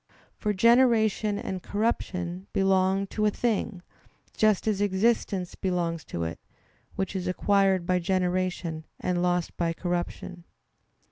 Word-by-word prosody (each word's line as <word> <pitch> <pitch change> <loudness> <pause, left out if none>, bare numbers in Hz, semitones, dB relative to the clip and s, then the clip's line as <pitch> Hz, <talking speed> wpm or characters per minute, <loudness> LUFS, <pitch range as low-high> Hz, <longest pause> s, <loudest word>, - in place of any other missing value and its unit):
For 210 - -1
generation 220 -1 +3
and 190 -2 -4
corruption 185 -4 -2
belong 195 0 +2
to 215 -1 +2
a - - +5
thing, 210 -4 -1 0.5
just 215 -1 +2
as 205 -2 +1
existence 195 -2 +1
belongs 170 -3 -2
to 85 - -4
it, 80 0 -4 0.6
which 190 0 -3
is 185 -1 -2
acquired 190 -1 +2
by 180 0 +2
generation 180 -3 -1
and 180 -1 -1
lost 180 -1 0
by 165 -1 0
corruption. 175 0 -4
190 Hz, 125 wpm, -27 LUFS, 180-205 Hz, 0.6 s, a